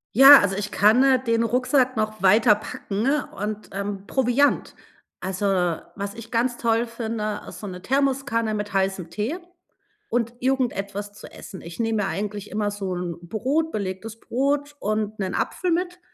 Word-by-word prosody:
Ja, 275 Hz, +3 st, +11 dB
also, 195 Hz, -1 st, 0 dB
ich 205 Hz, 0 st, -3 dB
kann, 215 Hz, +6 st, +5 dB
äh, 260 Hz, -2 st, +4 dB
den 230 Hz, -1 st, +2 dB
Rucksack 255 Hz, +2 st, +2 dB
noch 215 Hz, -2 st, -2 dB
weiterpacken 210 Hz, +1 st, +2 dB, 0.3 s
und, 210 Hz, +1 st, -4 dB
ähm 200 Hz, 0 st, -4 dB
Proviant. 265 Hz, +2 st, +2 dB, 0.4 s
Also, 190 Hz, +2 st, -3 dB, 0.5 s
was 200 Hz, 0 st, -4 dB
ich 230 Hz, +1 st, -11 dB
ganz 240 Hz, +1 st, +1 dB
toll 230 Hz, 0 st, +1 dB
finde, 220 Hz, -2 st, -3 dB
ist -, -, -9 dB
so 210 Hz, -, -7 dB
'ne 180 Hz, -1 st, -7 dB
Thermoskanne 265 Hz, -4 st, 0 dB
mit 210 Hz, -1 st, -4 dB
heißem 190 Hz, -3 st, 0 dB
Tee 215 Hz, -, -3 dB, 0.7 s
und 235 Hz, 0 st, 0 dB
irgendetwas 205 Hz, -6 st, -1 dB
zu 205 Hz, -, -12 dB
essen. 190 Hz, -, -10 dB
Ich 170 Hz, 0 st, -10 dB
nehme 225 Hz, -2 st, +1 dB
mir -, -, -1 dB
eigentlich 205 Hz, +1 st, -4 dB
immer 210 Hz, 0 st, -1 dB
so 195 Hz, -2 st, -4 dB
'n 175 Hz, -2 st, -4 dB
Brot 275 Hz, -, 0 dB
belegtes 210 Hz, +2 st, -4 dB
Brot 285 Hz, +3 st, -1 dB
und 215 Hz, 0 st, -2 dB
'nen 190 Hz, -1 st, -2 dB
Apfel 360 Hz, -, -1 dB
mit 355 Hz, +1 st, -1 dB
215 Hz, 160 wpm, -24 LUFS, 200-250 Hz, 0.7 s, Ja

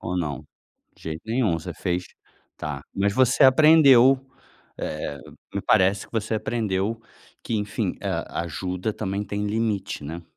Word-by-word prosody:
ou 90 Hz, -, -3 dB
não? 75 Hz, -5 st, -3 dB, 0.5 s
De -, -, -22 dB
jeito 80 Hz, 0 st, -5 dB
nenhum 115 Hz, -5 st, +1 dB
você 80 Hz, -, -7 dB
fez 90 Hz, 0 st, -2 dB, 0.5 s
tá. 75 Hz, -3 st, -5 dB
Mas 100 Hz, +1 st, +1 dB
você 130 Hz, +5 st, +3 dB
aprendeu 135 Hz, -2 st, +7 dB, 0.6 s
eh, 70 Hz, -, -4 dB, 0.4 s
me -, -, -1 dB
parece 95 Hz, +1 st, +2 dB
que -, -, -29 dB
você 110 Hz, -1 st, -1 dB
aprendeu 110 Hz, -1 st, -1 dB, 0.4 s
que 115 Hz, -, -2 dB
enfim, 105 Hz, -1 st, -2 dB
a -, -, -3 dB
ajuda 90 Hz, +5 st, -3 dB
também 100 Hz, -1 st, -3 dB
tem 105 Hz, +1 st, -3 dB
limite, 105 Hz, -7 st, -2 dB
né. 85 Hz, +4 st, -6 dB
100 Hz, 145 wpm, -24 LUFS, 90-115 Hz, 0.6 s, aprendeu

